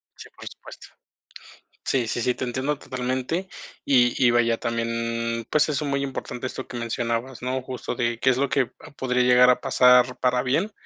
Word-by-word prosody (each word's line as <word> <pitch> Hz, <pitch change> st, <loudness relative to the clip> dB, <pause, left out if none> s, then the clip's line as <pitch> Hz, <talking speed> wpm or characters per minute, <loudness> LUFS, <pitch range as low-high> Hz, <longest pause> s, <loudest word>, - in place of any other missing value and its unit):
Sí, -, -, -12 dB
por -, -, -11 dB
supuesto. -, -, -12 dB, 1.0 s
Sí, 125 Hz, -3 st, 0 dB
sí, 115 Hz, -, -2 dB
sí, 125 Hz, +1 st, +1 dB
te -, -, -4 dB
entiendo 130 Hz, +4 st, -2 dB
totalmente 130 Hz, +8 st, -3 dB, 0.4 s
y 125 Hz, -3 st, +3 dB
y 120 Hz, -, +6 dB
vaya 115 Hz, -1 st, +2 dB
también, 115 Hz, 0 st, -2 dB
pues, 150 Hz, -, +3 dB
eso 150 Hz, 0 st, -1 dB
es 145 Hz, -, -2 dB
muy 140 Hz, 0 st, 0 dB
importante, 130 Hz, -2 st, -5 dB
esto 130 Hz, +1 st, -6 dB
que 125 Hz, -, -7 dB
mencionabas, 115 Hz, +1 st, -3 dB
¿no?, 130 Hz, +1 st, -2 dB
justo 130 Hz, -1 st, -5 dB
de 120 Hz, -1 st, -1 dB
qué 130 Hz, -, +3 dB
es 125 Hz, -, +1 dB
lo 140 Hz, +2 st, 0 dB
que 135 Hz, -3 st, +2 dB, 0.3 s
podría 125 Hz, -1 st, 0 dB
llegar 125 Hz, 0 st, +6 dB
a 125 Hz, -, +2 dB
pasar 125 Hz, 0 st, +4 dB
para 125 Hz, -1 st, +1 dB
bien 165 Hz, +12 st, 0 dB
125 Hz, 190 wpm, -24 LUFS, 120-130 Hz, 1.0 s, y